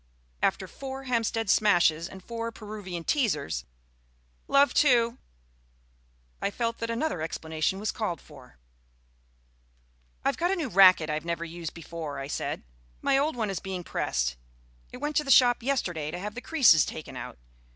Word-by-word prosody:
After 190 Hz, 0 st, +1 dB
four 270 Hz, +5 st, -7 dB
Hampstead 230 Hz, -3 st, 0 dB
Smashes 175 Hz, -5 st, +3 dB
and 190 Hz, -1 st, -11 dB
four 230 Hz, +1 st, -4 dB
Peruvian 205 Hz, -6 st, -7 dB
Teasers 165 Hz, -, 0 dB, 0.8 s
(love, 280 Hz, +1 st, +4 dB
two) 240 Hz, -3 st, +3 dB, 1.2 s
I -, -, +1 dB
felt 230 Hz, +2 st, -2 dB
that 230 Hz, -, -3 dB
another 230 Hz, -, -1 dB
explanation 160 Hz, +3 st, -2 dB
was 215 Hz, -, -1 dB
called 215 Hz, -7 st, -3 dB
for. 135 Hz, -, -16 dB, 1.7 s
"I've -, -, +1 dB
got 350 Hz, -, +1 dB
a 390 Hz, -, +2 dB
new 320 Hz, -8 st, -3 dB
racquet 185 Hz, -5 st, +6 dB
I've 150 Hz, 0 st, -2 dB
never 170 Hz, 0 st, -3 dB
used 170 Hz, -1 st, -7 dB
before," 165 Hz, -3 st, -6 dB
I 135 Hz, -, -4 dB
said. 140 Hz, -, -3 dB, 0.4 s
"My -, -, +3 dB
old 290 Hz, +2 st, +1 dB
one 220 Hz, -4 st, -1 dB
is 190 Hz, -, -3 dB
being 190 Hz, -2 st, -5 dB
pressed; -, -, -1 dB, 0.5 s
it -, -, -8 dB
went 295 Hz, +3 st, -3 dB
to 300 Hz, -, +3 dB
the 275 Hz, -, -7 dB
shop 245 Hz, -2 st, +6 dB
yesterday 180 Hz, -, -1 dB
to 175 Hz, -, -5 dB
have 205 Hz, +3 st, -5 dB
the 245 Hz, -, -7 dB
creases 255 Hz, -, +5 dB
taken 150 Hz, -4 st, -7 dB
out. 125 Hz, 0 st, -7 dB
200 Hz, 160 wpm, -28 LUFS, 165-245 Hz, 1.7 s, racquet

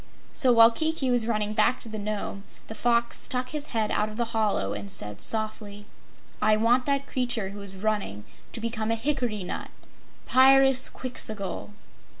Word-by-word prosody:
So, 255 Hz, -, +4 dB
while 230 Hz, -1 st, +7 dB
Kiki 315 Hz, 0 st, 0 dB
was 240 Hz, -2 st, +1 dB
running 210 Hz, -2 st, -1 dB
back 215 Hz, +3 st, +2 dB
to -, -, -5 dB
the 215 Hz, -1 st, -6 dB
Nome, 205 Hz, -1 st, -5 dB, 0.2 s
the -, -, -8 dB
Fox 235 Hz, +1 st, 0 dB
stuck 255 Hz, -2 st, -1 dB
his 300 Hz, -1 st, -3 dB
head 220 Hz, -3 st, -2 dB
out 210 Hz, -, 0 dB
of 215 Hz, -, -10 dB
the 240 Hz, -, 0 dB
hollow 210 Hz, -, 0 dB
and 100 Hz, -1 st, -6 dB
said 105 Hz, +1 st, +2 dB
softly: 215 Hz, -2 st, 0 dB, 0.6 s
"I 215 Hz, 0 st, +3 dB
want 240 Hz, +4 st, +2 dB
that 280 Hz, -1 st, 0 dB
creature 245 Hz, -7 st, -2 dB
who 200 Hz, +1 st, -9 dB
is 195 Hz, -1 st, -1 dB
running 205 Hz, -, -3 dB, 0.3 s
to -, -, -5 dB
become 225 Hz, -1 st, -3 dB
a 230 Hz, -, +1 dB
hickory 235 Hz, -5 st, -1 dB
nut -, -, -6 dB, 0.6 s
Pyrzqxgl!" 260 Hz, -6 st, +2 dB
225 Hz, 165 wpm, -26 LUFS, 210-250 Hz, 0.6 s, while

